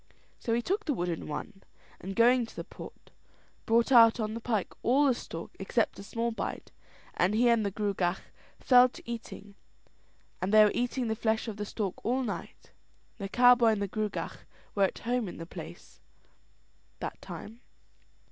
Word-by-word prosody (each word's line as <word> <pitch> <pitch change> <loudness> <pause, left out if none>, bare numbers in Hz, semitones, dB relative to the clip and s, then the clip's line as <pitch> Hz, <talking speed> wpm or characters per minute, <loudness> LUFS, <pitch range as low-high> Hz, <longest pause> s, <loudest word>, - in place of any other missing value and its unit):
So 230 - 0
he 240 - -1
took 405 - -1
the 290 - 0
wooden 175 -3 -3
one; 195 +7 -6 0.4
and 195 +1 -6
going 240 +1 +4
to - - -15
the - - -5
pot, - - -12 0.6
brought 230 +3 +3
out 230 -2 +7
on 215 -1 -2
the 230 - -4
pike 220 -4 -2
all 270 +5 +3
the 270 - +4
stork 165 -7 -7
except 215 +4 0
a - - -8
small 230 +3 -2
bite, 225 - -5 0.4
and 185 +4 +1
he 240 +2 +4
and 230 -2 +3
the 200 - 0
Gruagach 195 -3 -1 0.4
fell 250 -1 +6
to - - -13
eating, 225 -3 -7 0.9
and 185 +2 -1
they 215 0 +8
were 210 - +2
eating 245 0 -1
the 220 - -1
flesh 220 +1 0
of 215 -2 -5
the 210 - -3
stork 200 -3 -4
all 255 +4 0
night. 215 -5 -7 0.5
The 195 -1 -4
cowboy 245 0 +6
and 205 - -3
the - - -1
Gruagach 210 +1 -4 0.3
were 200 -1 +3
at - - -4
home 240 -1 -1
in 175 - -8
the 165 - -7
place - - -11 1.0
that - - -6
time. 225 +3 -9
220 Hz, 180 wpm, -29 LUFS, 200-240 Hz, 1.0 s, they